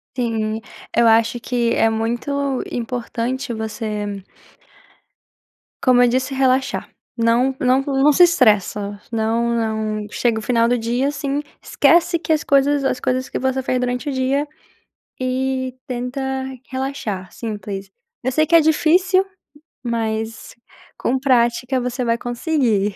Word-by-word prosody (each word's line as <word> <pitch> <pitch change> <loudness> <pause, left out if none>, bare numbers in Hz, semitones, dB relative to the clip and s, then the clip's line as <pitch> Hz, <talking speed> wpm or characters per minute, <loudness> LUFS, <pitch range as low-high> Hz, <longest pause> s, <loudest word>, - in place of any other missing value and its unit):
Sim, 225 -3 -1 0.3
eu 235 0 +4
acho 230 +1 +3
que 235 -1 0
é 225 - +3
muito 225 +5 -2 0.4
importante 240 +1 -3
você 210 -2 -4 1.6
como 250 -2 +5
eu 245 - +6
disse 260 +2 0
relaxar, 265 0 +1 0.3
não 240 +3 +2
não 255 +1 +3
não 275 +1 +3
se 355 - +5
estressa, 210 - +3
não 230 +1 0
não 220 -2 -2
chega 235 -2 0
o - - -6
final 230 0 +2
do 245 - +2
dia, 240 +4 0
assim, 285 0 -2 0.2
esquece 340 0 +3
que 320 - -1
as 305 - +1
coisas 280 0 +3
as 255 - 0
coisas 255 +1 -1
que - - -6
você 265 0 0
fez 255 0 0
durante 250 +3 -2
o - - -1
dia 265 +3 0 0.7
e 260 0 -1
tenta 250 +2 -4 0.5
relaxar 260 -9 -4
simples. 205 -3 -6 0.3
Eu 260 - 0
sei 310 +4 +2
que 335 - +1
é 335 - +9
difícil, 360 +5 +3 0.6
mas 225 -1 -3 0.4
com 260 +2 0
prática 250 0 +2
você 250 +1 -2
vai 230 -1 +1
conseguir. 240 - 0
245 Hz, 135 wpm, -20 LUFS, 225-270 Hz, 1.6 s, é